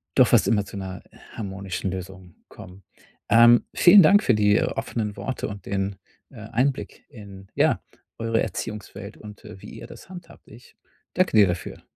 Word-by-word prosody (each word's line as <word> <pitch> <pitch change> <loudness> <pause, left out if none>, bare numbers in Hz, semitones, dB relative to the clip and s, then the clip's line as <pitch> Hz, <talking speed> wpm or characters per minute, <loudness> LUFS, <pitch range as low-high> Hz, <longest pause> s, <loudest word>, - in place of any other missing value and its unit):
doch - - +5
fast - - +3
immer 105 -3 +1
zu 100 - -10
'ner 95 -1 -7 0.3
harmonischen 95 -2 -5
Lösung 95 -1 -9
kommen. 95 +1 -14 0.5
Ähm, 120 +1 +6
vielen 190 +3 +7
Dank 205 +7 +5
für 125 - +3
die 105 0 +3
offenen 105 -3 -3
Worte 130 - -4
und 100 -2 -9
den, 100 0 -2 0.4
äh, 130 - -15
Einblick 125 +5 -3
in, 100 -7 -13
ja, - - +2 0.4
eure 115 0 -1
Erziehungswelt 105 0 -6
und, 105 +2 -13
äh, 105 -3 -12
wie - - -11
ihr - - -10
das - - -14
handhabt. 175 -2 -13
Ich 120 +4 -17 0.4
danke 185 -10 +1
dir 105 -2 +6
dafür. 90 0 -5
105 Hz, 165 wpm, -23 LUFS, 95-120 Hz, 0.5 s, vielen